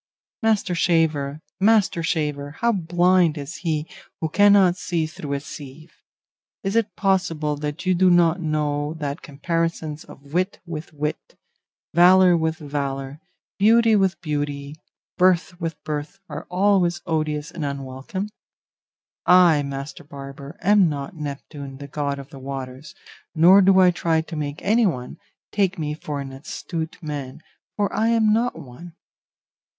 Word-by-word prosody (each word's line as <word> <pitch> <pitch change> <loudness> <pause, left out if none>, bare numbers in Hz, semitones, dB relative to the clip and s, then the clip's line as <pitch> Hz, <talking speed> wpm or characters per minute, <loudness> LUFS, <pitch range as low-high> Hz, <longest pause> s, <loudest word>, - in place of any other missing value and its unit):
Master 215 -4 +1
shaver, 155 -4 +1 0.2
master 205 -4 +3
shaver! 150 -3 -2
how 235 0 +3
blind 175 -3 +2
is 145 +3 -6
he 155 -2 -2 0.3
who 160 - -2
cannot 200 -1 +5
see 170 -3 -1
through 150 -2 -6
a 140 - -1
sieve. 150 +2 -11 0.7
Is 195 +2 -2
it 220 -4 +1
possible 165 -6 0
that 150 +4 -5
you 185 - +3
do 185 +1 +4
not 175 0 +4
know 150 -1 -1
that 145 -1 -4
comparisons 160 +1 -3
of 140 +1 -15
wit 185 +3 0
with 165 -2 -7
wit, 150 0 -4 0.6
valour 180 +1 +6
with 160 -1 0
valour, 140 -2 -4 0.4
beauty 225 +2 +5
with 190 -2 +2
beauty, 145 -2 -3 0.5
birth 180 0 +3
with 165 -1 -2
birth, 150 +4 -4
are 150 -1 -7
always 180 -2 +2
odious 155 -1 -2
and 170 - -6
unwelcome? 140 +7 -4 1.0
I, 175 -4 +6
master 140 0 -6
barber, 140 +1 -10
am 200 -3 +5
not 140 +3 -5
Neptune, 140 -2 -7
the 140 +1 -8
god 140 0 -2
of 140 0 -10
the 135 - -10
waters, 135 +1 -7 0.4
nor 180 +5 +7
do 190 0 +5
I 180 -1 +6
try 165 -2 +1
to 160 +1 -8
make 145 -1 -4
anyone 195 - +1 0.3
take 195 -2 +1
me 150 -2 -2
for 150 -1 -5
an 135 -1 -6
astute 160 +4 -6
man, 145 -1 -6 0.3
for 205 -2 0
I 220 - +2
am 225 -2 +3
not 235 +3 0
one. 160 +7 -11
160 Hz, 145 wpm, -23 LUFS, 145-185 Hz, 1.0 s, nor